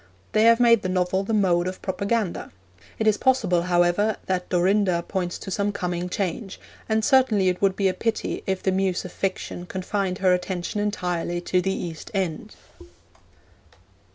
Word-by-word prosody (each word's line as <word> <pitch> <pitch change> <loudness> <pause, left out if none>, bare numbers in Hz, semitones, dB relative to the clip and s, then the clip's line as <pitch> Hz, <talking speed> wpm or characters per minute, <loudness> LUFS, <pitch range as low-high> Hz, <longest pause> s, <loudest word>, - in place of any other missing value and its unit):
They 215 +1 +3
have 230 +1 +6
made 230 -3 +5
the 185 - -3
novel 185 +1 0
the 200 - -4
mode 180 -5 +2
of 185 - -6
propaganda. 200 +1 -2 0.5
It 220 - -1
is 215 -1 +3
possible, 220 -10 +2
however, 175 +4 +2
that 185 -1 -2
Dorinda 185 -1 +2
points 180 -3 -2
to 195 - -8
some 200 +2 0
coming 180 -2 -3
change, 195 +2 -3 0.3
and 220 0 +1
certainly 240 -9 +4
it 180 - -3
would 195 -1 +2
be 195 -1 +1
a 185 - +1
pity 225 +2 -2
if 190 -1 -1
the 190 - +2
Muse 190 -1 0
of 180 - -7
Fiction 185 -2 -4
confined 190 0 -2
her 190 -3 +3
attention 180 +2 -2
entirely 180 -4 -2
to 180 +1 +1
the 195 - -1
East 165 -4 -6
End. 185 -5 -3
190 Hz, 170 wpm, -24 LUFS, 180-205 Hz, 0.5 s, have